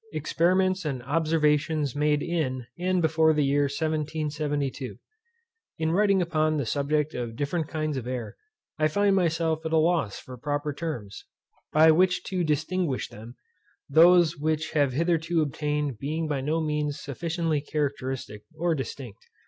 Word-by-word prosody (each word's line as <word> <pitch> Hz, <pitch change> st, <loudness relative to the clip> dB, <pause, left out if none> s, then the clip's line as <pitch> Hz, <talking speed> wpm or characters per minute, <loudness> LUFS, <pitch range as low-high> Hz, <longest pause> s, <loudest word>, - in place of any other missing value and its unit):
Experiments 185 Hz, +4 st, +1 dB
and 135 Hz, -5 st, -3 dB
Observations 150 Hz, -1 st, +1 dB
made 150 Hz, 0 st, +1 dB
in, 135 Hz, -8 st, -2 dB
and 180 Hz, 0 st, +1 dB
before 160 Hz, 0 st, +4 dB
the 150 Hz, -2 st, +2 dB
year 145 Hz, +1 st, +2 dB
1772. 150 Hz, -2 st, -2 dB, 0.8 s
In 160 Hz, 0 st, 0 dB
writing 195 Hz, 0 st, +3 dB
upon 155 Hz, -2 st, +1 dB
the 140 Hz, -, -1 dB
subject 150 Hz, +4 st, 0 dB
of 120 Hz, -2 st, -4 dB
different 150 Hz, +4 st, -2 dB
kinds 155 Hz, -3 st, -2 dB
of 125 Hz, -2 st, -5 dB
air, 125 Hz, -4 st, -4 dB, 0.4 s
I 155 Hz, -, +4 dB
find 200 Hz, +5 st, +2 dB
myself 165 Hz, -3 st, +1 dB
at 160 Hz, -, -3 dB
a -, -, +5 dB
loss 155 Hz, -, +1 dB
for 125 Hz, -2 st, -10 dB
proper 145 Hz, +2 st, -2 dB
terms, 130 Hz, -11 st, -6 dB, 0.5 s
by 160 Hz, +1 st, +6 dB
which 180 Hz, +3 st, +3 dB
to 185 Hz, -2 st, -2 dB
distinguish 155 Hz, -1 st, -1 dB
them, 115 Hz, +4 st, -11 dB, 0.5 s
those 170 Hz, +2 st, +6 dB
which 155 Hz, +1 st, -1 dB
have 145 Hz, -4 st, +2 dB
hitherto 165 Hz, +2 st, +1 dB
obtained 150 Hz, -3 st, -2 dB
being 155 Hz, +3 st, -2 dB
by 145 Hz, -3 st, -1 dB
no 155 Hz, +4 st, 0 dB
means 150 Hz, -1 st, -1 dB
sufficiently 165 Hz, +1 st, -2 dB
characteristic, 135 Hz, -7 st, -3 dB, 0.2 s
or 170 Hz, +1 st, +1 dB
distinct. 135 Hz, -6 st, -6 dB
155 Hz, 145 wpm, -26 LUFS, 140-165 Hz, 0.8 s, by